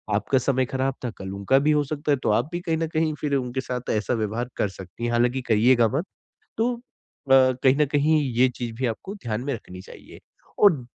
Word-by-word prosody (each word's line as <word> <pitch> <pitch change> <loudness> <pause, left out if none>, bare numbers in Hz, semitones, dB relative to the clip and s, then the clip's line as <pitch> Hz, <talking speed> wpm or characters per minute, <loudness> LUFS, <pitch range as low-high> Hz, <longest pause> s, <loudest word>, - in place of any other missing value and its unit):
आपका 110 +6 +1
समय 130 0 +1
ख़राब 130 0 0
था - - -1
कल 95 -1 -7
उनका 100 +7 +2
भी - - +5
हो 150 -1 +3
सकता 145 +1 -3
है। 140 - +3
तो - - +1
आप 120 +7 +1
भी 175 - -3
कहीं 165 -2 -1
न 165 0 -1
कहीं 155 0 +1
फिर 145 -2 0
उनके 130 -1 -2
साथ 125 -1 -5
ऐसा 110 +3 0
व्यवहार 115 +2 -2
कर 105 - 0
सकती 95 +4 -8
हैं 120 - -1
हालाँकि 120 +2 +1
कहियेगा 115 +2 +4
मत। 165 - -2 0.5
तो 235 +3 +1
अ, 235 - -15 0.5
कहीं 130 0 +5
न 150 - +4
कहीं 150 +2 +2
ये 125 +2 +4
चीज़ 120 -2 -5
भी 130 +3 -2
आपको 155 - -5
ध्यान 115 - -4
में 140 - -1
रखनी 90 -5 -9
चाहिए। - - -14 0.4
और 160 -12 +4
130 Hz, 225 wpm, -24 LUFS, 115-145 Hz, 0.5 s, भी